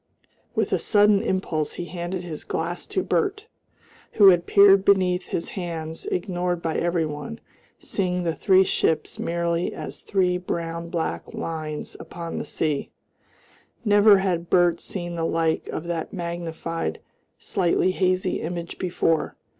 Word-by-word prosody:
With - - 0
a - - +2
sudden 205 -1 +4
impulse 160 -5 -1
he 175 - -5
handed 175 +1 -4
his 160 -4 -7
glass 170 +2 -3
to 375 - -1
Bert, 415 0 0 0.7
who 200 -2 +8
had 175 -2 +3
peered 200 -1 +7
beneath 185 -2 +3
his 165 - -3
hands, 165 -4 -5
ignored 180 -1 -1
by 165 -1 -2
every 170 -1 +1
one, 150 - -6 0.4
seeing 180 -2 -2
the 165 -1 0
three 190 +2 +4
ships 160 -4 0
merely 170 0 -1
as - - -7
three 180 -2 +1
brown 170 -1 -4
black 170 -2 -3
lines 155 -2 -4
upon 170 -1 -6
the - - -4
sea. 150 -3 -1 1.0
Never 205 0 +7
had 180 -3 -1
Bert 175 -2 +4
seen 175 -3 -5
the 165 -1 -2
like 165 -1 0
of 155 - -4
that 170 -2 -3
magnified 170 -2 -4 0.4
slightly 185 0 +1
hazy 185 0 0
image 170 +1 -5
before. 170 -3 0
175 Hz, 140 wpm, -24 LUFS, 165-185 Hz, 1.0 s, who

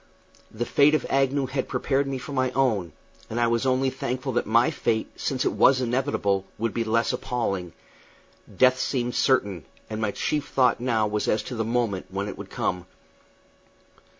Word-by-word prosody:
The 115 +2 -4
fate 145 +4 +4
of - - -1
Agnew 135 0 +2
had 130 0 -3
prepared 135 0 0
me 135 -1 -2
for 130 - -8
my 130 -2 +1
own, 110 -11 +1 0.4
and 115 - -3
I 120 - +3
was 115 +2 +1
only 130 +1 +2
thankful 130 +1 -3
that 120 -3 -1
my 115 +3 +4
fate, 110 -1 -1
since 130 -2 -2
it - - +2
was 130 -1 +4
inevitable, 120 -6 0
would 115 0 -2
be 115 - 0
less 115 +2 +1
appalling. 100 -9 -2 0.8
Death 130 0 +5
seemed 125 -2 -1
certain, 100 - +1 0.3
and 110 0 -3
my 110 - +1
chief 150 +8 -2
thought 125 -3 +2
now 115 -3 +1
was 105 0 -1
as 110 - +1
to 125 - -6
the 110 - -1
moment 115 -4 -1
when 100 +2 -3
it - - -5
would - - -9
come. 90 -1 -2
120 Hz, 180 wpm, -25 LUFS, 110-130 Hz, 0.8 s, Death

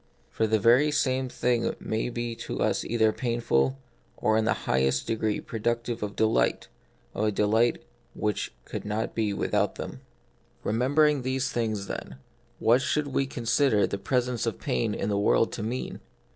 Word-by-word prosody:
For 110 - +1
the 110 0 +3
very 120 +8 +5
same 130 -3 +1
things 120 -1 0
may 110 +2 -2
be 120 -1 -3
to - - -5
us - - +1
either 110 -2 +2
painful, 120 - 0 0.4
or 110 - +2
in 110 0 +2
the - - +2
highest 65 +1 +1
degree 110 -1 -1
productive 115 +1 -2
of 105 -1 -4
delight, 110 0 +1 0.4
of 110 - -1
a 105 - +2
delight 110 +4 +2 0.3
which 105 -2 -1
could - - -5
not 105 +2 -2
be 110 -2 0
without 100 - 0
them. - - -7 0.6
Remembering 140 +6 +2
these 130 0 -1
things, 110 -4 -1
then, 65 - -6 0.4
what 120 +3 +4
should 150 +2 0
we 135 0 0
consider 120 -2 +2
the 100 - -4
presence 125 +3 0
of - - -2
pain 60 - -1
in 100 - -2
the 100 -1 +1
world 105 +2 +3
to - - -5
mean 120 +4 -4
115 Hz, 165 wpm, -27 LUFS, 105-125 Hz, 0.6 s, very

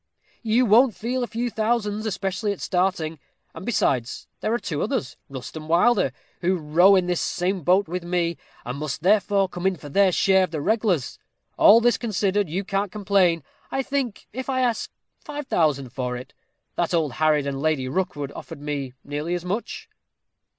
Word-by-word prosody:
You 235 +2 +2
won't 230 +2 +5
feel 250 +3 -2
a 245 - -1
few 235 +1 -3
thousands, 215 -1 -1
especially 200 +1 -2
at 200 - -5
starting; 180 -4 -1 0.3
and 165 - -9
besides, 130 - 0
there 215 - -1
are 235 - +2
two 170 -10 -4
others, 130 - -2
Rust 130 +1 -8
and 155 0 -8
Wilder, 180 - +4 0.3
who 185 +2 +1
row 175 +5 +5
in 185 -2 +3
the 180 0 0
same 180 +2 -1
boat 185 +5 +3
with 180 +2 -4
me, 170 -1 -1 0.3
and 125 +3 -5
must 150 0 -4
therefore 200 0 +3
come 180 0 -2
in 190 - +1
for 145 -3 -11
their 195 +5 +4
share 190 +1 +4
of - - -13
the 160 -1 -4
reg'lars. 195 - 0 0.4
All 225 +3 +7
this 240 0 +3
considered, 205 -4 0
you 185 +5 -2
can't 195 0 -1
complain, 195 -6 +2 0.3
I 270 - -1
think 270 -5 -3
if 260 +3 -5
I 260 -1 +1
ask 240 -3 0 0.3
five 295 -1 -6
thousand 145 - +1
for 125 -2 -3
it. 125 - -10 0.4
That - - +1
old 155 -4 +1
harridan, 145 -1 +1
Lady 150 -3 0
Rookwood, 145 -2 -2
offered - - -9
me 145 -3 -4
nearly 150 +4 -3
as 175 0 -5
much." 230 - -4
185 Hz, 180 wpm, -24 LUFS, 155-215 Hz, 0.4 s, All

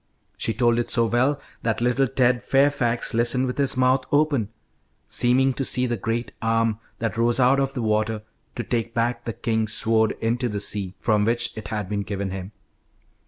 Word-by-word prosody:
She - - -2
told 120 0 +2
it 120 - -2
so 115 -1 +3
well 130 +5 +1 0.2
that 115 -1 -1
little 125 +3 +2
Ted 125 -1 +2
Fairfax 135 -4 +1
listened 120 +3 +2
with 125 +2 -4
his 135 -2 +1
mouth 130 +1 +3
open, 145 -7 +2 0.6
seeming 130 +2 +2
to 135 - -3
see 125 -1 +4
the 120 -1 -1
great 115 +2 -3
arm 115 -1 +1 0.2
that 115 -1 -3
rose 120 +2 +2
out 130 +2 +4
of 135 0 -1
the 125 - -2
water 110 0 0 0.3
to 120 - -3
take 115 +1 -3
back 120 +1 -1
the 115 - -3
king's 110 -1 -1
sword 110 -1 +2
into 120 +2 0
the 105 -1 -3
sea, 100 -2 -2
from 105 -2 +2
which 120 +2 0
it 110 - -7
had 105 -3 -3
been 100 +1 -2
given 100 -1 -4
him. 95 +1 -6
115 Hz, 190 wpm, -23 LUFS, 110-125 Hz, 0.6 s, see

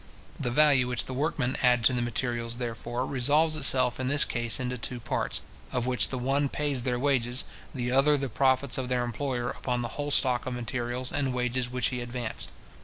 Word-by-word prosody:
The 125 - -1
value 135 -1 +4
which 125 -2 0
the 130 - -6
workmen 135 -2 -1
add 125 -2 +3
to 130 - +5
the 125 - 0
materials, 120 0 -2
therefore, 120 +1 -4
resolves 145 +5 +2
itself 130 -4 +4
in 130 - -2
this 145 +2 +5
case 120 -2 0
into 125 0 -3
two 125 +1 -3
parts, - - -2 0.3
of 125 -1 -1
which 125 -4 +2
the 130 - -4
one 135 +3 0
pays 145 -3 -1
their 125 0 -1
wages, 125 -2 +1 0.3
the 125 0 -3
other 140 +3 +4
the 135 -1 -2
profits 130 +1 +1
of 130 -1 -4
their 125 -1 0
employer 125 0 -3
upon 125 -1 -3
the 120 - -4
whole 145 - -3
stock 125 -3 +3
of 125 - -3
materials 120 +1 -2
and 135 -3 -1
wages 125 0 -1
which 125 0 0
he 125 -1 -4
advanced. 120 -1 -4
125 Hz, 200 wpm, -27 LUFS, 120-135 Hz, 0.3 s, to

